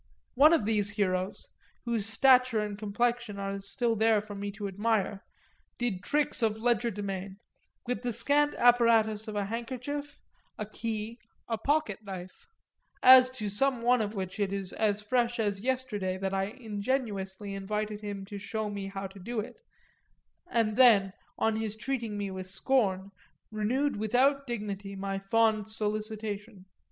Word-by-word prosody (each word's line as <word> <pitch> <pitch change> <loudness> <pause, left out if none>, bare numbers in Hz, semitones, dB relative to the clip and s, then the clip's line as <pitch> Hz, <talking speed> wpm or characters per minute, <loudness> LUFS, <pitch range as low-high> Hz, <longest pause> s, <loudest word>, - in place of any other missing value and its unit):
One 285 +4 +7
of 325 -11 +3
these 210 -2 +2
heroes, 190 -2 -1 0.4
whose 230 -3 -1
stature 250 +1 +4
and 210 -1 -1
complexion 220 +1 -1
are 195 0 -3
still 225 +4 -1
there 220 0 +4
for 210 0 -8
me 200 0 -4
to 205 0 -5
admire, 205 0 -1 0.5
did 230 -7 -2
tricks 295 +4 +1
of 220 -1 +1
legerdemain, 205 -5 -1 0.5
with 245 -2 -2
the 245 -1 -2
scant 285 +6 +2
apparatus 230 -3 +4
of 215 - -5
a 205 -1 0
handkerchief, 255 +6 -5 0.4
a 215 - -3
key, 220 +1 -5 0.3
a 225 -2 -2
pocket 290 -9 0
knife 185 -2 -9 0.6
as 255 0 +9
to 255 -5 -5
some 245 +5 +1
one 245 0 +4
of 210 0 -3
which 190 +1 -4
it 200 -2 0
is 195 -1 -3
as 210 -1 +1
fresh 240 +2 +1
as 205 -3 0
yesterday 215 -6 -2
that 190 0 -2
I 195 0 +1
ingenuously 205 -3 -3
invited 210 +2 -3
him 200 -2 -5
to 205 0 -7
show 215 +1 -3
me 200 -1 -4
how 195 0 -5
to 195 +1 -9
do 230 +5 -4
it, 215 - -7 0.9
and 220 -2 +1
then, 210 -7 +6 0.2
on 220 0 +1
his 220 -1 -2
treating 230 -2 -3
me 200 -1 -3
with 185 0 -6
scorn, 195 -2 +1 0.4
renewed 235 +6 0
without 265 +6 +2
dignity 205 -4 -4
my 195 0 -3
fond 215 +1 +2
solicitation. 215 -1 -4
215 Hz, 155 wpm, -29 LUFS, 200-240 Hz, 0.9 s, as